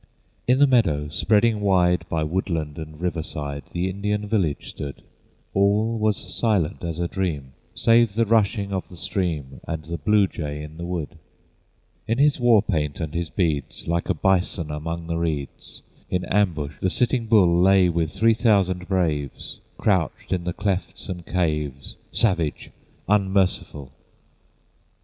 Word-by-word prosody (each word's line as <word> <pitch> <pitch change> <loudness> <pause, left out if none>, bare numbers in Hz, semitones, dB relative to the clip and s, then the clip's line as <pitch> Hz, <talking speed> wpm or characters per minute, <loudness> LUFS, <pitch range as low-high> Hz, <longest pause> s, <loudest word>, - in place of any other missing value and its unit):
In 125 +1 +4
the 145 - +6
meadow, 80 - +2
spreading 110 +7 +2
wide 90 -3 +2
By 80 -1 0
woodland 80 -2 -2
and 80 -1 -8
riverside 75 -4 -4
The 90 +1 -1
Indian 105 +2 -2
village 95 -9 0
stood; 70 -1 -7 0.5
All 105 +3 +2
was 105 -2 +2 0.2
silent 100 -7 0
as 85 -2 -3
a 85 0 -1
dream, 75 -9 -3 0.2
Save 115 -2 +4
the 115 +1 +3
rushing 105 -2 +2
a 95 - 0
of 95 - -6
the 90 - -12
stream 80 -9 -3
And 80 -2 -4
the 85 +1 -5
blue 105 -2 +4
jay 75 -5 -5
in 75 +1 -10
the 85 +1 -5
wood. 85 -1 -4 0.9
In 115 - +1
his 145 0 +3
war 120 -4 +5
paint 75 -7 -1
and 80 -3 -4
his 85 -1 -2
beads, 80 -8 -2
Like 85 +1 -1
a 95 - +2
bison 90 -2 +1
among 80 +3 -4
the 85 0 -2
reeds, 75 -5 -4 0.3
In 90 -1 -1
ambush 85 -8 0
the 95 - +2
Sitting 120 +2 0
Bull 90 -6 +5
Lay 95 0 +5
with 85 -2 0
three 110 +4 +3
thousand 100 -6 +2
braves 80 -7 -2 0.2
Crouched 95 -7 0
in 90 -2 -2
the 90 - -1
clefts 100 0 -3
and 90 -2 -5
caves, 75 -6 -2 0.2
Savage, 85 -9 0 0.4
unmerciful! 95 -8 +1
90 Hz, 155 wpm, -23 LUFS, 80-100 Hz, 0.9 s, the